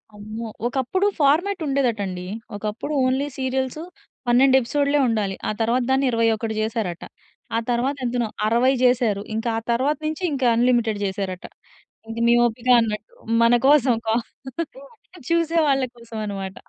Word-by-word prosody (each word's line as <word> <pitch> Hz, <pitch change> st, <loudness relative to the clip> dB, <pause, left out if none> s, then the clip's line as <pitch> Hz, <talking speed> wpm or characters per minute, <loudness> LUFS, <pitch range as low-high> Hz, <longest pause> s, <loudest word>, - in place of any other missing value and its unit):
అమ్మో! 215 Hz, +2 st, -7 dB, 0.2 s
ఒకప్పుడు 270 Hz, +10 st, 0 dB
ఫార్మాట్ 335 Hz, +7 st, +2 dB
ఉండేదట 260 Hz, -6 st, +1 dB
అండి. 180 Hz, -1 st, -6 dB, 0.3 s
ఒకప్పుడు 215 Hz, +8 st, -4 dB
ఓన్లీ 265 Hz, +3 st, +1 dB
సీరియల్స్ 260 Hz, +2 st, -2 dB, 0.5 s
12 260 Hz, +2 st, +5 dB
ఎపిసోడ్లే 285 Hz, +4 st, +1 dB
ఉండాలి. 205 Hz, -4 st, -1 dB
ఆ -, -, +1 dB
తరువాత 240 Hz, +3 st, +2 dB
దాన్ని 270 Hz, +1 st, +2 dB
21 225 Hz, -1 st, +1 dB
జేసారట. 215 Hz, -6 st, -2 dB, 0.5 s
ఆ -, -, +3 dB
తరువాత 250 Hz, +4 st, 0 dB
ఎంతనో? 240 Hz, -1 st, 0 dB, 0.2 s
60 240 Hz, +4 st, +3 dB
జేసారు. 240 Hz, -5 st, +2 dB
ఇంకా 225 Hz, +1 st, -1 dB
ఆ -, -, 0 dB
తరువాత 270 Hz, +6 st, +1 dB
నుంచి 310 Hz, +3 st, -3 dB
ఇంక 270 Hz, -2 st, -2 dB
అన్‌లిమిటెడ్ 235 Hz, -3 st, +2 dB
జేసారట. 190 Hz, -2 st, -3 dB, 0.6 s
ఇది 230 Hz, +1 st, -4 dB
మీ 235 Hz, -, +5 dB
ఓపిక 240 Hz, +2 st, -2 dB
అన్నట్టు! 215 Hz, -2 st, -3 dB, 0.3 s
మన 230 Hz, +1 st, +5 dB
కోసం 275 Hz, -4 st, +5 dB
కా 220 Hz, -, +2 dB, 1.1 s
చూసే 335 Hz, 0 st, +1 dB
వాళ్ళ 270 Hz, -1 st, +2 dB
కోసం 230 Hz, -1 st, -10 dB
అన్నమాట. 195 Hz, -2 st, -5 dB
240 Hz, 140 wpm, -22 LUFS, 220-270 Hz, 1.1 s, 12